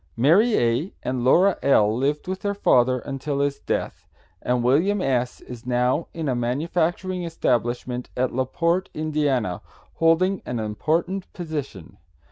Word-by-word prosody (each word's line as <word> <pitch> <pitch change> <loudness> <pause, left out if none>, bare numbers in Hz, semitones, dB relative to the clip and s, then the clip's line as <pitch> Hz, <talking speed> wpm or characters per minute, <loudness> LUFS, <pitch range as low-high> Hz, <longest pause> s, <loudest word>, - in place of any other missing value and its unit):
Mary 190 - +4
A. 120 +10 0
and 125 -1 -2
Laura 180 +9 +4
L. 110 -6 +3
lived 145 +6 -1
with 185 0 -3
their 200 0 -1
father 130 -9 +3
until 140 +1 -4
his 140 0 0
death, - - -3 0.3
and 125 -1 0
William 165 +12 +3
S. 125 -6 -1
is 125 0 -10
now 125 +5 +1
in 165 -2 -4
a 130 - +1
manufacturing 165 +9 -1
establishment 125 -6 -1
at 130 0 0
La 130 +1 0
Porte, 170 +7 0
Ind., 155 0 -4 0.8
holding 175 +4 +2
an 125 - -4
important 165 - -2
position. 145 - -6
140 Hz, 140 wpm, -23 LUFS, 125-170 Hz, 0.8 s, Mary